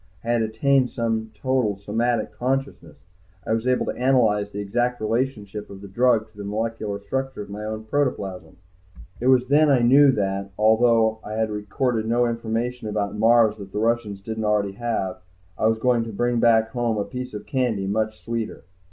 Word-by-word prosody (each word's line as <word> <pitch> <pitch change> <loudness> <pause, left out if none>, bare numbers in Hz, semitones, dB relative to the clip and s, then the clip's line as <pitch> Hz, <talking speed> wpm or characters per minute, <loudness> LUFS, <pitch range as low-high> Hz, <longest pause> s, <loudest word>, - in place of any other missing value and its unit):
I 115 - -5
had 120 -1 +2
attained 125 +4 +2 0.5
total 125 -4 0
somatic 110 +3 -1
consciousness; 130 - -3 0.5
I - - 0
was 115 +2 -1
able 125 0 +2
to - - -1
analyze 115 -6 +2
the 100 - -9
exact 120 +5 -1
relationship 110 -3 -2
of 100 -1 -10
the 100 - -9
drug 115 +2 +2
to 105 - -25
the 100 - -6
molecular 105 0 -3
structure 130 +3 -4
of 100 - -12
my 105 +1 -6
own 110 0 -4
protoplasm. 110 -7 -2 0.6
It 125 - -1
was 130 -1 +5
then 150 +3 +4
I 130 -4 +4
knew 135 +3 +6
that, 100 -2 -2
although 110 0 +3
I 105 - -6
had 110 0 -1
recorded 110 +2 -1
no 120 +1 +2
information 115 +1 -2
about 105 -1 -2
Mars 110 0 +4
that 100 -2 -10
the - - -5
Russians 110 -3 0
didn't 110 +2 -4
already 105 -2 +1
have, 100 -4 -3 0.3
I 110 - +1
was 110 0 +2
going 120 0 +2
to 115 - -6
bring 120 +3 0
back 115 -1 +4
home 120 -2 -1
a 100 - -1
piece 125 -2 -6
of 105 - -7
candy 125 -8 -1
much 110 +2 -1
sweeter. 115 -2 -4
110 Hz, 185 wpm, -23 LUFS, 105-120 Hz, 0.6 s, knew